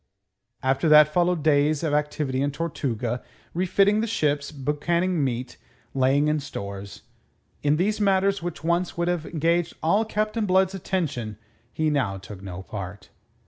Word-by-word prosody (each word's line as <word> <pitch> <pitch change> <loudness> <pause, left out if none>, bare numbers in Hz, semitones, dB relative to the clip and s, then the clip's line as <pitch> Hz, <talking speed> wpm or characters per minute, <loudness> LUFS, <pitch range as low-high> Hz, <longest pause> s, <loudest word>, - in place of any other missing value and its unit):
After 135 +4 +2
that 150 0 +8
followed 175 -2 +2
days 150 0 +3
of 155 -3 0
activity 150 -3 0
in 140 - +1
Tortuga, 130 -6 -2 0.3
refitting 195 +4 +3
the 230 - -1
ships, 150 -9 0
boucanning 155 +4 0
meat, 125 -1 -3 0.4
laying 135 +2 +3
in 150 0 +1
stores. 100 -8 -7 0.6
In 145 0 +3
these 210 +6 0
matters 195 -1 +2
which 175 -2 -5
once 170 +2 0
would 170 0 0
have 175 -3 -1
engaged 170 +1 0
all 200 +7 +3
Captain 215 0 -1
Blood's 190 0 +3
attention, 155 - -3 0.3
he 155 -1 0
now 125 -10 0
took 95 0 -10
no 95 -1 -7
part. 100 0 -7
150 Hz, 145 wpm, -25 LUFS, 130-175 Hz, 0.6 s, that